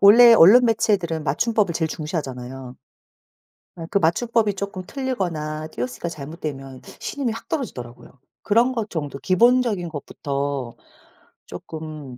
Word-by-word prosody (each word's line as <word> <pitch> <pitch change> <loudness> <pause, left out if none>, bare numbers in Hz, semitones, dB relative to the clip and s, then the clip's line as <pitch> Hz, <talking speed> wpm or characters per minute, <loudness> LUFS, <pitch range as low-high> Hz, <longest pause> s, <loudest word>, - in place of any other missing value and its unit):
원래 230 +4 +9
언론 230 +6 +8
매체들은 195 -8 +1
맞춤법을 200 - +1
제일 160 -1 0
중시하잖아요. 130 -5 -6 1.0
예 165 - -6
그 - - -3
맞춤법이 210 +5 +1
쪼끔 195 -1 -5
틀리거나 170 - -3
띄어쓰기가 125 +4 -4
잘못되면 140 -4 -7 0.2
신임이 265 -5 -2
확 230 - -9
떨어지더라고요. 125 - -5 0.3
그런 235 +5 +3
것 225 -4 -3
정도 145 -4 -4
'기본적인 220 - +2
것부터 140 -4 -4 0.7
쪼끔 155 -5 -8
165 Hz, 325 characters per minute, -22 LUFS, 140-225 Hz, 1.0 s, 원래